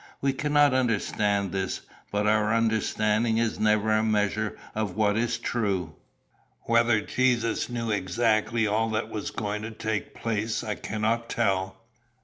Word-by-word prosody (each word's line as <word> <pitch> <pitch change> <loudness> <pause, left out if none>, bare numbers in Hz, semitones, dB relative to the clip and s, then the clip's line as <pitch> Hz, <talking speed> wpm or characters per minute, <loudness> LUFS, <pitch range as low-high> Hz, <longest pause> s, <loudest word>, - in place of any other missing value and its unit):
We 135 0 +1
cannot 145 0 +3
understand 105 -5 +1
this; 95 -1 -2 0.3
but 105 +1 0
our 110 +1 +3
understanding 110 0 +1
is 115 -1 0
never 110 0 +2
a 110 0 +3
measure 105 0 0 0.2
of 105 -4 -2
what 105 -1 +2
is 120 +2 0
true. 100 -9 -1 0.7
"Whether 115 -1 +3
Jesus 120 -2 0
knew 115 -2 -2
exactly 110 +3 +1
all 110 +2 +1
that 110 0 -2
was 110 -2 -4
going 105 -1 -3
to 110 - -5
take 110 -1 -4
place 110 0 -2
I 105 -2 -2
cannot 115 +3 -2
tell. 95 -3 -1
110 Hz, 140 wpm, -26 LUFS, 105-115 Hz, 0.7 s, cannot